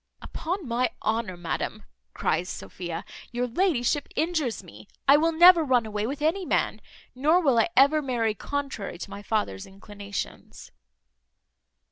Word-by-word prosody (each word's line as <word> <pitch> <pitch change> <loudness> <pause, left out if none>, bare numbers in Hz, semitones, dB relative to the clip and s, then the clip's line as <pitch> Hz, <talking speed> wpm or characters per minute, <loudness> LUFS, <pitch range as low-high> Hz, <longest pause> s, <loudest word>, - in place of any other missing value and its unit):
"Upon 350 -1 -4
my 240 +1 +1
honour, 220 -4 -1
madam," 175 -1 -4 0.3
cries 180 - 0
Sophia, 175 -2 -6 0.3
"your 245 +1 -1
ladyship 285 -1 +1
injures 315 -8 -1
me. 105 +1 -14 0.2
I 275 - +8
will 325 +3 +3
never 345 +1 +7
run 250 -5 +2
away 210 0 -2
with 285 +3 -4
any 345 +5 +1
man; - - 0 0.3
nor 300 +7 +3
will 270 -9 +3
I 285 - +3
ever 280 +3 +6
marry 235 -5 0
contrary 275 -6 -4
to 185 - -7
my 200 +1 -7
father's 205 - -2
inclinations." 200 +1 -8
245 Hz, 140 wpm, -26 LUFS, 205-305 Hz, 0.3 s, I